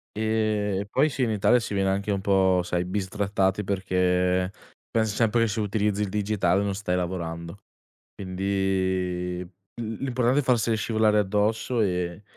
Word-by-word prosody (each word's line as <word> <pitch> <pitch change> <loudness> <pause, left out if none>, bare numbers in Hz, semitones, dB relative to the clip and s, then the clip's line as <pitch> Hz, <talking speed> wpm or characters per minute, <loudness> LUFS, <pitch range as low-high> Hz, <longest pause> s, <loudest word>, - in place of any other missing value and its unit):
E 105 -2 0
poi 155 - +3
sì, 135 -2 -2
in 115 - +1
Italia 110 +4 +3
si 110 - -5
viene 95 -1 +1
anche 100 +2 -1
un 100 - 0
po', 95 -2 +3
sai, 90 0 -1
bistrattati 100 +1 -1
perché 90 -1 +1 0.4
pens 110 -2 0
sempre 115 +1 +2
che 115 - +3
se 110 +1 -2
utilizzi 105 0 0
il 100 - -1
digitale 100 -2 +1
non 100 -1 -1
stai 95 -3 -1
lavorando. 85 0 -4 0.6
Quindi 95 -2 -1
l 90 - -10 0.5
l'importante 130 +1 +1
è - - 0
farsele 115 -3 +2
scivolare 110 -1 +2
addosso 105 +4 0
e 90 0 -1
100 Hz, 150 wpm, -25 LUFS, 95-110 Hz, 0.6 s, poi